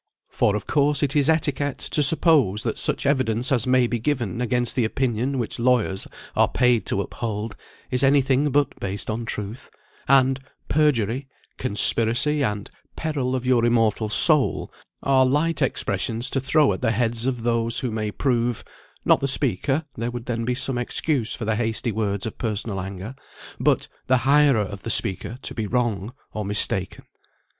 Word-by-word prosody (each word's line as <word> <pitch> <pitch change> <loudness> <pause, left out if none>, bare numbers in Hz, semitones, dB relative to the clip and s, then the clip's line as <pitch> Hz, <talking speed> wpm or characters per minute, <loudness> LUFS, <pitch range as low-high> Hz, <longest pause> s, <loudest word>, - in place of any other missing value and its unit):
For, 105 - +1
of 105 - -4
course, 145 +1 +1
it 140 0 -1
is 145 0 +3
etiquette 145 -3 +1
to 150 - 0
suppose 140 - +3
that - - -2
such - - 0
evidence 130 -3 0
as 125 -2 +1
may 130 -1 +3
be 120 0 -2
given 120 -5 -2
against 120 0 0
the 125 - +1
opinion 125 +3 -1
which 120 -2 -3
lawyers 120 -6 +1 0.3
are - - +4
paid 125 -3 +1
to 100 - 0
uphold, 105 0 -5 0.4
is 125 -1 +1
any 140 +1 +4
thing 135 +2 +1
but 145 +1 0
based 100 +2 -3
on 115 +2 -4
truth; 105 +2 -6 0.4
and 135 0 +4 0.3
"perjury," 135 -4 +1 0.3
"conspiracy," 120 +5 +1
and 105 -4 -3 0.2
"peril 140 -5 -2
of 130 -1 -4
your 125 -2 +3
immortal 115 -2 +1
soul," 150 +5 +4 0.3
are 135 -1 +4
light 150 +5 0
expressions 115 -2 -1
to 135 - 0
throw 140 -2 +3
at 95 - -7
the - - +1
heads 115 +1 0
of 125 -3 -2
those 115 -1 0
who 125 - -2
may 110 -1 -2
prove 120 0 -1 0.4
(not - - +4
the 135 - -1
speaker, 135 - 0
there 115 +2 -3
would 120 -1 -7
then 115 -2 -3
be 125 +1 -1
some 125 -1 -1
excuse 125 0 -1
for 115 - -6
the 110 0 0
hasty 115 +1 -1
words 100 -2 -2
of 110 - -7
personal 105 -3 -3
anger, 95 +5 -7 0.5
but) - - +1 0.2
the 130 - +4
hirer 140 -4 +4
of 95 0 -8
the 115 - -6
speaker 115 +2 +2
to - - -2
be 110 -2 -3
wrong, 115 -3 -1 0.2
or 105 - -3
mistaken. 100 -2 +2
120 Hz, 175 wpm, -23 LUFS, 110-135 Hz, 0.5 s, are